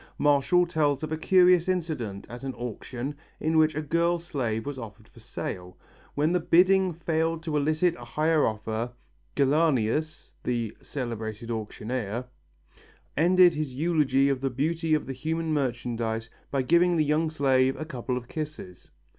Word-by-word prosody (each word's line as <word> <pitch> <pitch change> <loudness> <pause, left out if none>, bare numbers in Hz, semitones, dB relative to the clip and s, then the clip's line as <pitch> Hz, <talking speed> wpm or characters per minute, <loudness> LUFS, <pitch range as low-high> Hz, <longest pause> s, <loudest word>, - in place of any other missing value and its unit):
Martial 145 +5 +3
tells 150 -4 0
of 155 - -4
a - - +1
curious 180 +1 +4
incident 155 - -2
at 120 +2 -9
an 135 -1 -4
auction 125 +3 -5 0.3
in 160 +1 0
which 155 -1 +3
a 155 - -2
girl 170 +3 +1
slave 130 -10 -3
was 140 -2 -5
offered 110 -4 -10
for - - -18
sale. 90 0 -6 0.4
When 150 +3 +2
the 180 - +2
bidding 185 +3 +4
failed 165 0 -1
to 160 -3 -3
elicit 155 +4 +2
a 120 - -10
higher 155 +5 +2
offer, 110 +2 -3 0.4
Gellianus, 145 0 +1
the 120 -3 -2
celebrated 115 -3 -5
auctioneer, 115 +1 -4 0.9
ended 180 +3 +5
his 150 -4 -4
eulogy 145 -3 +2
of 135 -2 0
the 135 - 0
beauty 160 +5 0
of 150 - -2
the 135 - -5
human 160 +4 -2
merchandize 120 -4 -2 0.2
by 135 -2 0
giving 170 +5 +4
the 155 -2 +2
young 155 +2 +1
slave 135 -3 +2
a 155 - -4
couple 125 -4 -3
of 120 -1 -7
kisses. 150 - -7
145 Hz, 155 wpm, -27 LUFS, 120-160 Hz, 0.9 s, ended